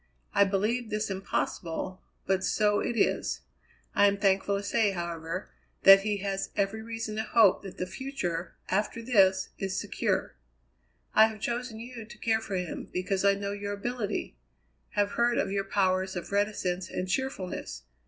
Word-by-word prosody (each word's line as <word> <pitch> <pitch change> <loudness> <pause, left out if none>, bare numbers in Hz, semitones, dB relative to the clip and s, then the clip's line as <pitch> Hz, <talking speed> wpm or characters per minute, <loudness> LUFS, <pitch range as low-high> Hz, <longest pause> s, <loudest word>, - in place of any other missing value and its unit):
I 200 - +6
believed 215 +5 0
this 215 -1 -1
impossible, 185 -1 -3 0.2
but 190 0 +1
so 210 +1 +2
it 235 - -2
is. - - +1 0.5
I 205 - +6
am 200 0 +2
thankful 200 0 +2
to 200 - -4
say, 205 0 +2
however, 170 +1 -4 0.3
that 195 0 +10
he 210 0 0
has 195 -1 -2
every 200 +2 0
reason 225 -1 -5
to - - +1
hope 220 -2 +4
that 195 -2 -9
the 180 - -2
future, 185 -7 -4
after 210 +4 0
this, 195 -6 +4
is 195 -1 -1
secure. - - -1 0.8
I 220 +1 +7
have 220 -1 -8
chosen 235 0 -3
you 235 0 -8
to 215 0 -13
care 220 0 +1
for 205 -3 -4
him, 180 -2 -4
because 185 +1 -1
I 200 0 +5
know 200 0 -3
your 205 0 -4
ability; 215 0 -3 0.6
have 205 0 +1
heard 240 0 +2
of 195 - 0
your 195 0 0
powers 190 -1 +1
of 180 - -5
reticence 190 -3 0
and 185 - -3
cheerfulness. 195 -3 -3
200 Hz, 165 wpm, -29 LUFS, 190-220 Hz, 0.8 s, that